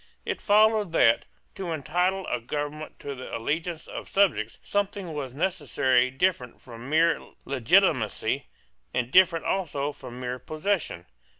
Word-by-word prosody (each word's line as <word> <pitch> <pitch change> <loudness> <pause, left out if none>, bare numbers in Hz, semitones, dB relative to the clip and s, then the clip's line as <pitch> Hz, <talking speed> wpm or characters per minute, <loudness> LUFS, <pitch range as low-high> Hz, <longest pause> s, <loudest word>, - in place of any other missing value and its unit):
It - - -3
followed 210 -3 +4
that, 115 -7 +4 0.3
to 185 -3 -5
entitle 180 +5 0
a 125 - -1
government 145 +4 -5
to 140 - -5
the 130 -1 -6
allegiance 160 +7 -3
of - - -8
subjects, 160 - +2
something 200 -4 -2
was 135 -4 -5
necessary 140 -7 +2
different 130 -3 -1
from 120 +1 -10
mere 165 +2 +3 0.2
legitimacy, 135 - +2 0.5
and 125 0 -1
different 175 -2 +5
also 150 -7 -1
from 125 -3 -10
mere 125 0 -4
possession. 155 - -2
155 Hz, 130 wpm, -26 LUFS, 125-185 Hz, 0.5 s, different